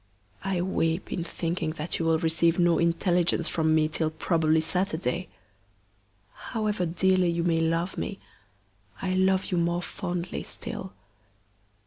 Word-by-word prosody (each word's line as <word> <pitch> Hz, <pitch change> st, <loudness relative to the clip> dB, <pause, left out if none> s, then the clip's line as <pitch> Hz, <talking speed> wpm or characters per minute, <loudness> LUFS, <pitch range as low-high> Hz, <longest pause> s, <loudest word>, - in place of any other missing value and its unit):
I 190 Hz, -2 st, 0 dB
weep 165 Hz, -2 st, -1 dB
in 175 Hz, -, -2 dB
thinking 165 Hz, -1 st, -2 dB
that 155 Hz, +1 st, -3 dB
you 165 Hz, -, 0 dB
will 165 Hz, 0 st, +3 dB
receive 165 Hz, +1 st, +2 dB
no 175 Hz, -2 st, +3 dB
intelligence 170 Hz, 0 st, +2 dB
from 160 Hz, -1 st, +2 dB
me 155 Hz, -1 st, +3 dB
till 155 Hz, 0 st, 0 dB
probably 160 Hz, 0 st, +2 dB
Saturday. 180 Hz, +1 st, -1 dB, 1.1 s
However 210 Hz, -6 st, -2 dB
dearly 185 Hz, +1 st, +2 dB
you 170 Hz, 0 st, 0 dB
may 165 Hz, -1 st, +2 dB
love 165 Hz, +3 st, 0 dB
me, 200 Hz, -, -3 dB, 0.8 s
I 185 Hz, -1 st, -1 dB
love 190 Hz, +1 st, +2 dB
you 180 Hz, -, +2 dB
more 170 Hz, +1 st, 0 dB
fondly 180 Hz, -2 st, -4 dB
still. 95 Hz, -, -7 dB
170 Hz, 135 wpm, -27 LUFS, 165-185 Hz, 1.1 s, will